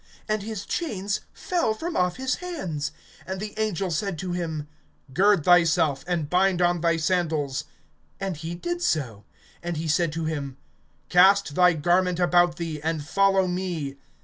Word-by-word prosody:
And 215 -1 0
his 210 -1 -5
chains 205 - -2
fell 335 -12 -1
from 335 +8 -4
off 180 -1 +1
his 260 0 -1
hands. 180 - -4 0.4
(8)And 190 +1 -3
the 210 +2 -5
angel 195 -4 -1
said 185 +2 -2
to 180 +2 -4
him: 160 -4 -3 0.5
Gird 195 +1 +4
thyself, 165 -5 +4
and 170 -4 -1
bind 180 +2 +2
on 175 -1 +2
thy 165 -1 +2
sandals; 155 -5 0 0.5
and 195 -2 -2
he 165 +3 -5
did 345 - -3
so. 125 - -1 0.4
And 175 -1 -3
he 160 +1 -3
said 165 +1 +2
to 165 0 -3
him: 140 -4 -4 0.5
Cast 190 -2 +5
thy 180 +2 +5
garment 175 +3 +1
about 175 -1 +4
thee, 165 -4 -5
and 160 -1 -2
follow 195 +3 +3
me. 175 -6 -3
175 Hz, 160 wpm, -25 LUFS, 160-195 Hz, 0.5 s, Cast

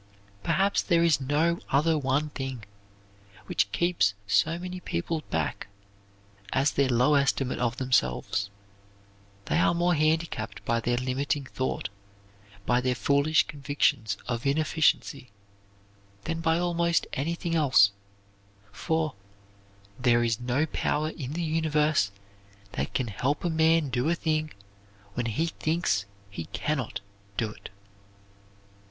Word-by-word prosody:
Perhaps 190 - +2
there 170 -2 +2
is 160 -5 +3
no 155 +5 +1
other 155 +4 +3
one 145 +1 0
thing 130 -5 -5 0.8
which 100 - 0
keeps 170 - +2
so 160 +11 +2
many 180 +1 -6
people 160 - -2
back 80 +3 -2 0.9
as 135 +2 +3
their 140 -1 +1
low 125 +4 +3
estimate 140 -2 +1
of 120 0 0
themselves. 100 - 0 1.0
They - - +1
are 170 - +3
more 175 +1 +2
handicapped 160 +1 -1
by 115 - +1
their 120 +1 0
limiting 135 +3 -1
thought, 130 -3 -3 0.8
by 125 0 +2
their 125 0 0
foolish 140 +4 +3
convictions 140 -7 0
of 120 +1 -2
inefficiency, 155 -2 +1 0.9
than 165 0 -3
by 165 0 +2
almost 170 -1 +1
anything 165 +4 -2
else, 130 -11 +5 0.8
for 160 +3 -1 0.9
there 120 -1 +3
is 115 -1 0
no 125 +5 +1
power 155 0 -1
in 140 -4 -6
the 170 +2 -2
universe 155 -7 +2 0.6
that - - -4
can 130 - +1
help 140 - -1
a 175 - +1
man 160 -1 +3
do 125 +4 0
a 170 - +2
thing 155 -2 -1 0.6
when 120 +1 -2
he 115 +9 0
thinks 160 - 0 0.3
he 85 -5 -5
can 150 - -2
not 125 -6 -4 0.4
do 110 -1 0
it. - - -11
145 Hz, 130 wpm, -27 LUFS, 125-160 Hz, 1.0 s, else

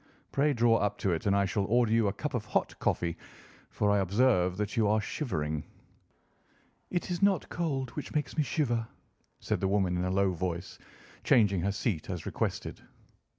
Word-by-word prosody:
Pray 145 +2 +2
draw 115 -3 +4
up 105 0 0
to 95 - 0
it, 85 +3 -1
and 100 - +3
I 100 0 +3
shall 100 0 0
order 120 +2 +2
you 115 -2 +3
a - - +2
cup 150 +8 -4
of 120 -4 -1
hot - - 0
coffee, 85 -1 0 0.5
for 105 -1 +1
I 100 - +3
observe 95 -2 +2
that 105 +2 -2
you 110 -3 +3
are 105 +1 +3
shivering." 80 - -3 1.3
"It 180 0 -2
is 175 - -2
not 200 -1 +2
cold 135 -7 -2
which 150 - -7
makes 150 -5 -1
me 155 - +2
shiver," 120 -5 0 0.5
said - - -1
the 95 - 0
woman 95 -2 +1
in 90 - 0
a - - 0
low 95 0 +2
voice, 90 0 -4 0.4
changing 100 -6 +4
her 100 - 0
seat 100 -5 -2
as 90 -3 -4
requested. - - -3
105 Hz, 190 wpm, -30 LUFS, 95-125 Hz, 1.3 s, draw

